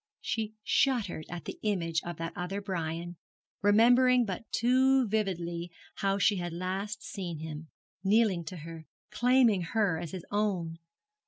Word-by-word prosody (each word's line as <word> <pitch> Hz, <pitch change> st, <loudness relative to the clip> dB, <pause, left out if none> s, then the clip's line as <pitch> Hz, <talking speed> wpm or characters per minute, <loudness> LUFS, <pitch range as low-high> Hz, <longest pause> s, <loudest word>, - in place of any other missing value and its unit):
She 225 Hz, -5 st, -2 dB
shuddered 225 Hz, -, +1 dB
at 175 Hz, -1 st, -6 dB
the -, -, -7 dB
image 165 Hz, -6 st, 0 dB
of 175 Hz, -2 st, -6 dB
that 165 Hz, 0 st, -4 dB
other 180 Hz, +3 st, -3 dB
Brian, 175 Hz, -3 st, -4 dB, 0.4 s
remembering 245 Hz, +4 st, +5 dB
but 200 Hz, +2 st, -6 dB
too 260 Hz, +1 st, +3 dB
vividly 175 Hz, -5 st, -2 dB, 0.3 s
how 195 Hz, 0 st, +1 dB
she 200 Hz, 0 st, +3 dB
had 175 Hz, -2 st, -3 dB
last 190 Hz, +4 st, -3 dB
seen 175 Hz, -5 st, -5 dB
him, 155 Hz, 0 st, -7 dB, 0.3 s
kneeling 200 Hz, -3 st, +3 dB
to 180 Hz, +3 st, -6 dB
her, 165 Hz, 0 st, -9 dB, 0.2 s
claiming 240 Hz, -3 st, +4 dB
her 175 Hz, -1 st, 0 dB
as 170 Hz, -, -5 dB
his 185 Hz, 0 st, -7 dB
own. 185 Hz, -6 st, -1 dB
190 Hz, 145 wpm, -30 LUFS, 170-220 Hz, 0.4 s, remembering